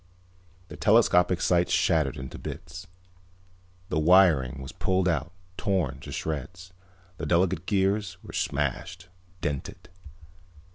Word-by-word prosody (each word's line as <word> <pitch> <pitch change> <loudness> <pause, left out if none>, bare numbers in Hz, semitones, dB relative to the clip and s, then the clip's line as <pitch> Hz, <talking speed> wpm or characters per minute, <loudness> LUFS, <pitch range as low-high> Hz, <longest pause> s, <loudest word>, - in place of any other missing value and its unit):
The - - -9
telescopic 90 0 +4
sights 90 -1 +2
shattered 75 -5 +2
into 65 0 -8
bits. 90 +3 -8 1.0
The 80 - 0
wiring 80 -7 +4
was 65 0 -7
pulled 95 -1 0
out, 80 -1 -1 0.3
torn 85 -9 -1
to - - -9
shreds. 85 +4 -5 0.4
The - - -4
delicate 90 0 +1
gears 100 -2 0
were - - -11
smashed, 85 +6 -3 0.3
dented. 70 -2 -5
85 Hz, 110 wpm, -27 LUFS, 75-95 Hz, 1.0 s, telescopic